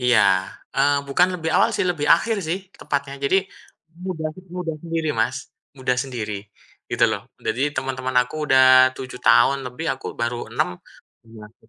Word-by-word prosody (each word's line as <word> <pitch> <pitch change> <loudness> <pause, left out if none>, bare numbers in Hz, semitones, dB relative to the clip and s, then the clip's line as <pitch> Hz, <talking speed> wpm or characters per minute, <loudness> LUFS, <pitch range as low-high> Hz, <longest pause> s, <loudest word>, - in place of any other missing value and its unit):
iya. 125 -2 +4 0.5
Eee, 140 +1 +2
bukan 175 +6 +3
lebih 160 0 -2
awal - - +4
sih, - - 0
lebih 160 -5 -1
akhir 215 +7 +4
sih 165 +4 -2 0.2
tepatnya. 140 -1 -3
Jadi, 165 - +3 0.7
muda 170 -4 -3
sih 185 - -13
muda 180 -2 -4
sendiri, 165 -2 -2
Mas. 120 +3 +1 0.4
Muda 125 -1 0
sendiri 110 -6 -4 0.4
gitu - - +3
loh. - - -3 0.2
Jadi 130 - 0
teman-teman 130 -1 -3
aku 125 - -11
udah 130 -1 +7
7 130 -1 -7
tahun 140 - +5
lebih, 125 +7 -6
aku - - -10
baru 120 -1 -3
6. 90 -7 -1 0.5
Iya 115 -2 -12
sih 110 - -27
135 Hz, 165 wpm, -22 LUFS, 125-160 Hz, 0.7 s, udah